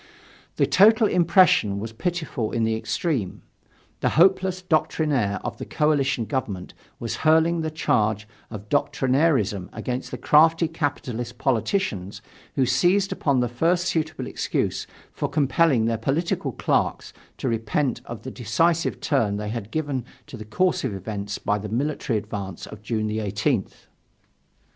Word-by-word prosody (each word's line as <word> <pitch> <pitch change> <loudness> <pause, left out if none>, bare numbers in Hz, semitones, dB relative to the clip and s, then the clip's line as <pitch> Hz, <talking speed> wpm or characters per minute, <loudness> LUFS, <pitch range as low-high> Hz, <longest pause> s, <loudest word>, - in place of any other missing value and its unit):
The - - +3
total 220 +3 +5
impression 175 - +4
was 110 +2 -6
pitiful 155 -5 -3
in 115 - 0
the 110 0 +1
extreme: 110 - -2 0.6
the - - +1
hopeless 185 +1 +4
doctrinaire 150 - +1
of - - -5
the - - -4
coalition 140 -6 +1
government 105 -8 -4 0.3
was 115 - -3
hurling 160 +2 +3
the 160 - -2
charge 110 -8 0 0.2
of 105 -2 -8
doctrinairism 130 - +1
against 125 +4 -4
the - - -5
crafty 160 +2 +4
capitalist 125 -7 -3
politicians 115 - -1 0.4
who 130 - +3
seized 180 +11 +2
upon 135 -4 +1
the 120 - +1
first 170 +9 +1
suitable 160 -3 -2
excuse - - -2 0.2
for - - -3
compelling 140 -3 +2
their 115 -1 0
political 145 +9 -1
clerks - - -1 0.2
to - - -3
repent 115 +3 -1
of 120 -2 -8
the 130 - -6
decisive 165 +9 0
turn 110 -8 +1
they 105 0 -4
had 110 -2 -5
given 145 -3 -2 0.2
to - - -10
the 110 -2 -8
course 180 +12 +1
of 120 -7 -2
events 100 +1 -5
by 105 0 -1
the 105 +1 -6
military 130 0 -1
advance 100 -3 -6
of 110 - -11
June 110 0 -2
18th. 105 -2 -2
125 Hz, 145 wpm, -24 LUFS, 110-160 Hz, 0.6 s, total